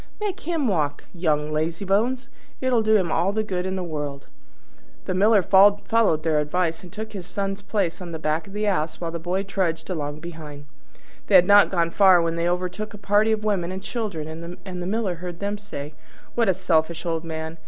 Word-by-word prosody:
Make 415 -4 -3
him 325 -4 -1
walk, 155 -8 0
young 155 -4 0
lazybones! 195 +11 0 0.3
It'll 255 -3 +2
do 220 0 +3
him 185 -6 +2
all 190 - +2
the 215 +1 0
good 185 -3 -2
in 190 - -2
the 185 - -3
world." 145 -4 -5 0.8
The - - -1
Miller 205 +1 +4
followed 200 -2 +4
their 155 -2 +2
advice, 165 +2 -1
and 180 - -12
took 220 +2 -7
his 185 -3 -7
Son's 195 0 -3
place 200 -3 -1
on 175 -2 -7
the 160 - -4
back 155 +2 -1
of 195 - -12
the 210 +1 -1
Ass 160 -6 0
while 170 -1 -3
the 170 - -4
boy 180 +4 -1
trudged 190 -3 -2
along 150 -3 -3
behind. 155 -3 -9 0.6
They - - +4
had 175 - +8
not 205 +1 +7
gone 170 -3 +1
far 190 -1 +6
when 165 0 0
they 170 +1 0
overtook 185 +4 -3
a - - -9
party 205 +2 +2
of 215 -1 0
women 190 -5 0
and 190 +1 -6
children, 170 -6 -5
and 180 -2 -6
the 175 - -3
Miller 200 -3 -1
heard 175 0 -7
them 205 +1 -3
say, 150 -8 -7 0.4
"What 230 -4 +2
a 190 - +3
selfish 170 -2 0
old 165 -1 -1
man! 160 0 -5
180 Hz, 205 wpm, -24 LUFS, 165-205 Hz, 0.8 s, had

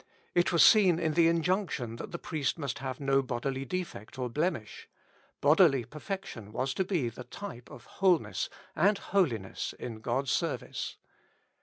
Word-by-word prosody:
It 175 0 +3
was 170 - +6
seen 195 -6 +7
in 160 -2 0
the 165 +1 +5
injunction 165 - 0
that - - -7
the 170 - -4
priest 155 -4 -2
must 140 -3 -3
have 130 -1 -4
no 135 -1 +3
bodily 130 +1 -3
defect 135 - -5
or 125 -1 -2
blemish; 150 -7 -2 0.5
bodily 145 -4 +5
per 150 +7 -10
fection 150 - -6
was 130 +4 -1
to 190 - 0
be 180 -9 0
the 120 +2 -9
type 125 -13 -8
of - - -12
wholeness 165 - +1 0.3
and 200 +5 +4
holiness 135 - -1
in 115 -3 -6
God's 130 +4 -1
service. - - -2
140 Hz, 160 wpm, -30 LUFS, 125-175 Hz, 0.5 s, seen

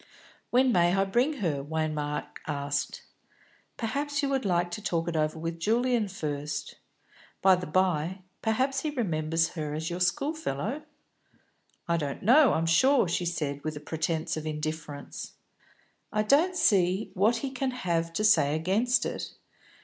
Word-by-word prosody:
"When 255 +1 +4
may 175 -3 +3
I 195 0 +2
bring 245 +10 +2
her!" 145 -4 -1
Waymark 150 -1 -3
asked. 145 -1 -2 0.7
"Perhaps 285 +5 -2
you 280 - +1
would 270 -4 0
like 175 -2 +1
to 195 - -5
talk 170 -4 -1
it 170 - -2
over 155 0 0
with 165 +1 -4
Julian 235 +3 +1
first? 145 -5 -4 0.7
By 190 0 +7
the 180 0 -1
by, 185 +1 0 0.2
perhaps 260 +5 +1
he 310 - -1
remembers 165 - 0
her 150 -3 -4
as 160 +2 -3
your 175 - -3
schoolfellow?" 255 - -1 1.1
"I 170 0 +2
don't 145 -4 -4
know, 260 +5 +6
I'm 165 - +1
sure," 245 +9 +4
she 175 +1 -1
said, 145 -4 -3
with 155 -1 -3
a - - -5
pretence 160 +1 -2
of 155 0 -5
indifference. 155 -1 -5 0.8
"I 215 - +1
don't 310 - +3
see 190 - +2
what 210 +5 +3
he 265 - -4
can 265 0 -1
have 170 -9 -1
to 210 - -1
say 150 -9 +4
against 200 +10 +1
it. - - -5
175 Hz, 155 wpm, -28 LUFS, 155-235 Hz, 1.1 s, By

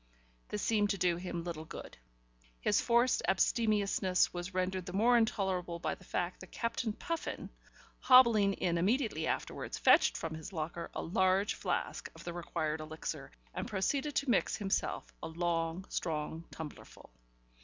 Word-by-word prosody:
This 210 - -3
seemed 210 -2 +2
to 200 - 0
do 175 -2 +2
him 175 -1 -4
little 165 -2 -5
good. 160 - -9 0.6
His - - +2
forced 240 +1 +3
abstemiousness 200 -3 +2
was 175 +1 -4
rendered 185 0 -1
the 180 - -5
more 230 +5 +4
intolerable 190 -6 +1
by 170 - -2
the - - -12
fact 180 0 -2
that 185 - -12
Captain 230 -1 -1
Puffin, 335 +7 -4 0.5
hobbling 235 -6 +6
in 170 -3 0
immediately 205 - +1
afterwards, - - -3
fetched - - +5
from 165 -1 -4
his 160 +3 -7
locker 170 0 -4
a - - -2
large 190 +2 +2
flask - - -2
of - - -11
the 175 - -5
required 160 -2 -2
elixir, 155 +1 -5 0.2
and - - -3
proceeded 270 +9 -1
to 280 - +1
mix - - +2
himself 195 - -2
a - - -4
long, 165 +1 -1
strong 160 0 -3
tumblerful. 150 - -10
185 Hz, 155 wpm, -33 LUFS, 170-210 Hz, 0.6 s, hobbling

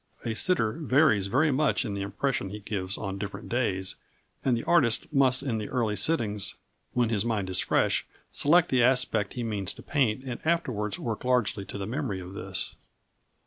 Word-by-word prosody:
A 115 - -1
sitter 110 - +1
varies 140 -9 +3
very 140 +9 +3
much 140 +2 +2
in 105 - -3
the 100 - -3
impression 100 +2 -2
he 105 - -6
gives 100 -2 -4
on 100 -1 -4
different 100 +1 -6
days, 95 -6 -1 0.5
and 125 -3 +2
the 115 - -4
artist 125 -9 +3
must 135 -2 +3
in 120 -5 -1
the 105 - -5
early 115 -5 0
sittings, 105 -9 0 0.4
when 120 -2 +2
his 105 -3 +1
mind 105 -5 -1
is 95 - +1
fresh, - - +1 0.2
select 165 +4 +4
the 130 -2 +3
aspect 125 -4 +3
he 120 - -3
means 105 -5 -2
to - - -13
paint 130 -5 +1
and 125 -3 -5
afterwards 125 -11 0
work 115 -3 -4
largely 125 -6 +1
to 100 - -7
the 100 - -4
memory 120 -3 -3
of 90 +1 -9
this. 95 -2 -2
115 Hz, 185 wpm, -28 LUFS, 100-130 Hz, 0.5 s, select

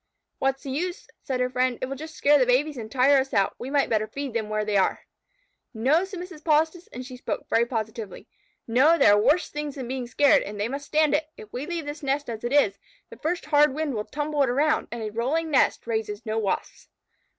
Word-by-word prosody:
"What 270 0 +1
is 270 - -24
the 270 - -5
use?" 350 +6 -3
said 260 -2 -3
her 250 - +1
friend. 255 -1 +1
"It - - -2
will 270 +1 -5
just 315 +3 -9
scare 290 +1 +4
the 255 - +4
babies 285 +5 +2
and 220 -3 -7
tire 270 +2 +5
us 265 0 -3
out. 195 -1 +2
We 245 - -5
might 280 0 +2
better 215 -1 0
feed 275 +3 -5
them 220 -2 -2
where 215 0 -1
they 210 -1 -1
are." 195 - +2 0.7
"No," 280 +11 +2
said 380 -2 -8
Mrs. 360 -3 -9
Polistes, 320 +3 +1
and 250 +1 -7
she 255 -1 -9
spoke 250 - -5
very 235 +1 +3
positively. 220 -3 -5 0.4
"No! 270 +8 +5
There 205 - +6
are 205 - +4
worse 295 +10 +2
things 295 -1 -4
than 260 -4 -6
being 255 -1 -4
scared, 285 +3 +4
and 205 0 -7
they 205 - 0
must 280 +3 -6
stand 310 -1 +2
it. 300 +1 +1
If 215 - -13
we 255 +4 -4
leave 340 -3 -3
this 295 +2 -6
nest 275 -2 -1
as 220 0 -7
it 240 - -2
is, 215 -9 +3 0.3
the - - -10
first 335 +3 -2
hard 295 -2 +4
wind 310 -2 -2
will 210 -2 -3
tumble 295 0 -2
it 270 - +3
around, 290 +5 +1
and 235 -1 -5
a 215 - -4
rolling 290 +9 -1
nest 270 - +2
raises 220 -2 -3
no 220 0 -1
Wasps." 200 -3 -3
270 Hz, 240 wpm, -25 LUFS, 230-300 Hz, 0.7 s, There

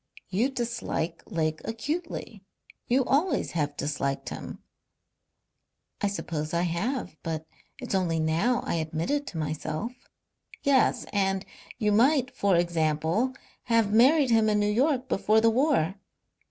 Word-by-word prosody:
"You 210 +8 +1
dislike 235 -9 -3
Lake 155 -5 -1
acutely. 230 - -4 0.4
You 255 +1 +3
always 310 +8 +1
have 145 -3 -2
disliked 140 -2 -2
him." - - -7 1.4
"I 205 - +2
suppose 160 -5 -3
I 170 - +2
have. 180 - -2
But 160 -1 -4 0.3
it's 250 -5 -5
only 175 -4 +1
now 170 +10 +1
I - - -1
admit 160 - -2
it 290 0 0
to 175 - -6
myself." 155 +7 -3 0.7
"Yes. 275 -4 +3
And 195 -1 +1 0.3
you 215 -3 +1
might, 255 +4 +3
for 200 -7 +2
example, 170 - +1 0.3
have 225 -3 +2
married 265 +4 +5
him 220 -1 +4
in 210 0 +2
New 205 0 +2
York 260 +3 +1
before 215 -1 +3
the 225 0 +4
war." 250 - +2
210 Hz, 135 wpm, -27 LUFS, 165-250 Hz, 1.4 s, married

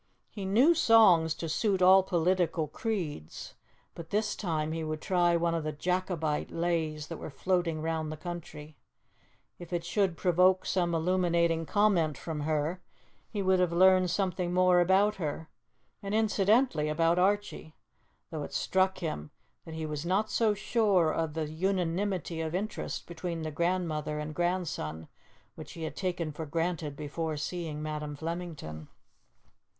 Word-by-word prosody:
He 200 -3 -6
knew 240 - +5
songs 200 - +5
to 165 - -5
suit 195 +4 0
all 185 +1 +7
political 175 -3 +1
creeds, 155 - -4 0.4
but 165 -1 -9
this 210 +1 0
time 160 -5 -2
he 165 0 -3
would 155 0 -3
try 175 0 +2
one 170 0 +1
of 165 -2 -1
the 155 - -2
Jacobite 170 -1 -1
lays 165 -3 -1
that 165 +1 -7
were - - -7
floating 165 +1 -1
round 160 -1 -2
the 155 - -6
country; 155 -2 -8 0.8
if 175 -1 -10
it 175 -1 -1
should 190 -2 0
provoke 185 +1 +3
some 175 -2 0
illuminating 170 -1 +1
comment 185 -9 +2
from 160 -2 -5
her, 155 +4 -1 0.5
he 205 -2 -3
would 190 0 +3
have 180 -2 +2
learned 185 +1 +5
something 180 -1 -1
more 180 0 +4
about 195 +4 +3
her, 160 -2 -4 0.5
and 200 +1 -3
incidentally 215 - +2
about 165 +3 +2
Archie, 195 -4 0 0.6
though 155 -2 -4
it - - -7
struck 190 0 +1
him 75 - -4 0.4
that 160 - -8
he 160 0 -4
was 150 -1 -4
not 190 +5 0
so 220 -3 +2
sure 200 -7 +2
of 160 -2 -2
the 160 -2 -2
unanimity 180 0 -1
of 160 +1 -3
interest 210 +3 -4
between 170 -1 -5
the 155 - -3
grandmother 155 -2 -1
and 150 0 -4
grandson 165 - -2 0.5
which - - -10
he 165 - -7
had 160 - -4
taken 175 -4 -2
for 155 +1 -6
granted 165 -1 -2
before 155 +2 -4
seeing 155 -1 -4
Madam 150 -1 -4
Flemington. 160 - -6
170 Hz, 155 wpm, -29 LUFS, 155-185 Hz, 0.8 s, all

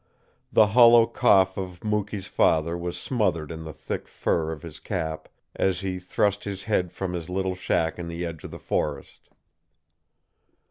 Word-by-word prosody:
The 110 - +6
hollow 120 -1 +8
cough 95 -6 +3
of 90 -2 -7
Mukee's 105 -2 -2
father 85 -2 +2
was 85 0 -4
smothered 85 - -1
in 80 0 -7
the 80 - -6
thick - - -6
fur 80 -1 -1
of 80 +1 -7
his 80 -3 -9
cap 80 0 -4 0.3
as 95 -1 +1
he 95 -1 -3
thrust 100 +2 0
his 100 -1 -4
head 90 -5 0
from 95 -2 -4
his 85 -1 -5
little 95 0 -1
shack 85 -2 -1
in 85 - -5
the 85 +1 -4
edge 80 -2 -7
of - - -7
the - - -8
forest. 70 -3 -3
90 Hz, 170 wpm, -25 LUFS, 85-100 Hz, 0.3 s, hollow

